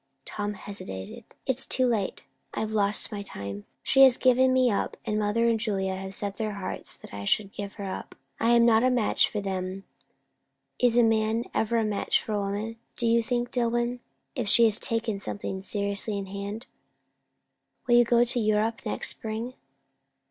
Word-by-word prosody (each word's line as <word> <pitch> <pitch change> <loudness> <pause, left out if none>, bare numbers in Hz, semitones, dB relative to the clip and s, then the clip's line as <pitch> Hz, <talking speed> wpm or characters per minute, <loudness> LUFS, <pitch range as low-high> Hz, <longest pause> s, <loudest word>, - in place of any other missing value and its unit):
Tom 205 0 -4
hesitated. 95 - -7 0.2
"It's 265 0 0
too 255 - +2
late. 225 -6 -1 0.3
I've 220 0 -2
lost 205 -1 +2
my 205 -1 -4
time. 100 - -7 0.2
She 270 - +4
has 265 -2 +8
given 255 0 +4
me 255 -2 +3
up, 200 - -2
and 215 0 0
mother 215 +3 +1
and 230 -1 +2
Julia 195 -4 0
have 190 0 -5
set 200 -1 -3
their 215 -2 -2
hearts 200 -2 -5
that - - -14
I 100 0 -6
should 200 - 0
give 200 0 -6
her 205 - -8
up. 190 -1 -6 0.2
I 230 - +2
am 235 0 +5
not 225 0 +5
a 255 - +4
match 245 -4 +2
for 210 - -3
them. 190 0 -4 1.0
Is 245 -1 +3
a 240 - +6
man 225 +1 +1
ever 230 +1 +1
a 225 - +2
match 210 -1 +1
for 215 - -5
a 205 - 0
woman, 205 +3 -3 0.2
do 235 - -1
you 230 0 +4
think, 240 +1 -2
Dillwyn, 240 0 0 0.3
if 245 -5 -3
she 230 +1 +6
takes 225 -1 0
something 190 -1 -4
seriously 200 +1 -1
in 200 - -4
hand?" 200 +4 -6 1.2
"Will 240 - +3
you 240 - +7
go 235 0 +4
to 245 0 0
Europe 215 +1 +1
next 215 - 0
spring?" 225 +3 -4
215 Hz, 185 wpm, -27 LUFS, 200-235 Hz, 1.2 s, has